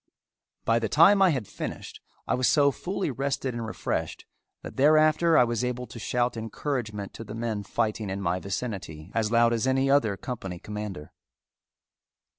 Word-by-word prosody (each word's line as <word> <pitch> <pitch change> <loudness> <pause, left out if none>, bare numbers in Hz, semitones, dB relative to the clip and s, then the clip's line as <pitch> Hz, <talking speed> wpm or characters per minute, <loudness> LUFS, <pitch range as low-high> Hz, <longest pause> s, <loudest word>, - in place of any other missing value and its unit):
By 115 0 +3
the 110 -2 -2
time 195 +6 +6
I 190 - +6
had 130 - -1
finished - - -7 0.3
I - - +1
was 125 -1 +2
so 140 -2 +4
fully 185 +2 -3
rested 135 0 -2
and 120 0 -4
refreshed - - -3 0.4
that - - -8
thereafter 155 +3 +4
I - - +7
was 120 0 -1
able 125 0 -2
to 120 - -10
shout 120 +2 0
encouragement 110 -2 -4
to - - -8
the 105 -1 -8
men 115 -2 -2
fighting 110 0 -2
in 95 +1 -3
my 90 -1 -1
vicinity 95 -6 -5
as 110 -2 +1
loud 115 0 +4
as 115 +2 0
any 135 +1 +2
other 115 -8 +3
company 95 -8 -6
commander. 105 -5 -7
120 Hz, 170 wpm, -27 LUFS, 105-135 Hz, 0.4 s, I